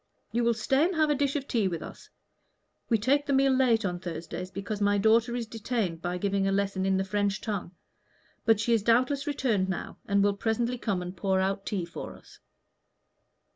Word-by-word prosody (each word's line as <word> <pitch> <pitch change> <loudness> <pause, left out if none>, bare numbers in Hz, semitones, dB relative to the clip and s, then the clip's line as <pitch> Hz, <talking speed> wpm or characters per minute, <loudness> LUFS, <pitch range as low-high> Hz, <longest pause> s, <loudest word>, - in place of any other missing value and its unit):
You 235 +1 0
will 235 0 +2
stay 265 +6 +2
and 365 +1 -1
have 310 -1 +3
a - - +3
dish 280 0 0
of 280 -1 -2
tea 220 -5 +1
with 170 -3 -3
us: - - -11 0.8
we 230 - +4
take 280 +7 +1
the 280 - +1
meal 270 0 +4
late 240 -4 +3
on 175 -2 -2
Thursdays, 175 +1 -6
because 200 +2 -5
my 205 0 +3
daughter 225 +3 +3
is 240 -1 -2
detained 220 -6 -3
by 180 +1 -2
giving 195 +1 0
a - - +1
lesson 195 -1 0
in 190 0 +2
the 190 - +1
French 200 0 0
tongue. 200 -4 -4 0.7
But 225 -3 +4
she 235 +2 +1
is 225 - +3
doubtless 255 +6 +2
returned 230 -10 0
now, 190 - -5
and 200 -1 +3
will 205 0 +3
presently 235 +4 -1
come 190 -6 -1
and 180 +1 -7
pour 190 +1 +1
out 195 +1 -1
tea 190 -5 -1
for 170 - -8
us." - - -18
210 Hz, 210 wpm, -28 LUFS, 190-240 Hz, 0.8 s, we